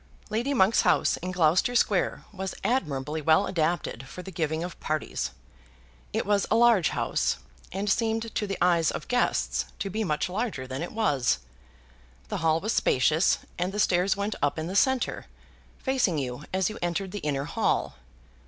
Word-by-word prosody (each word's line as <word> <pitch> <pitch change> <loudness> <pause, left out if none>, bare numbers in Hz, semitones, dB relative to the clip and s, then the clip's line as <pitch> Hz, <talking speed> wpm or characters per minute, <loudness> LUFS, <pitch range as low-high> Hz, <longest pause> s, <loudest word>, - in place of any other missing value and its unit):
Lady 235 +6 0
Monk's 225 -5 +4
house - - +3
in 180 - -5
Gloucester 180 +6 +2
Square 205 -5 +2
was 190 -1 -4
admirably 150 - -1
well 160 +6 +4
adapted 160 -7 -1
for 180 +7 -9
the 190 - -8
giving 160 -1 -1
of 175 0 -7
parties. 155 -1 -2 0.8
It - - -1
was 205 0 +2
a - - +3
large 230 -7 +5
house, - - 0 0.3
and 195 +2 -3
seemed 225 +1 0
to 210 - -1
the 195 - -3
eyes 170 -2 +3
of - - -5
guests 245 0 +1
to 195 - -3
be 220 +3 -1
much 150 -4 0
larger 190 - -3
than 130 +2 -5
it 175 - -4
was. 145 - +1 0.9
The - - -2
hall 160 0 +2
was 215 +6 -1
spacious, 155 +7 +3 0.2
and 180 +2 0
the 210 - -4
stairs 185 0 +2
went 200 +2 -1
up 145 +2 +1
in 160 - -2
the 185 +3 -4
centre, 260 +4 +1 0.5
facing 260 - +1
you 135 +1 -4
as 190 -1 +1
you 215 - -5
entered 175 +2 -2
the 205 - -4
inner 140 -4 -2
hall. - - 0
180 Hz, 175 wpm, -27 LUFS, 155-210 Hz, 0.9 s, large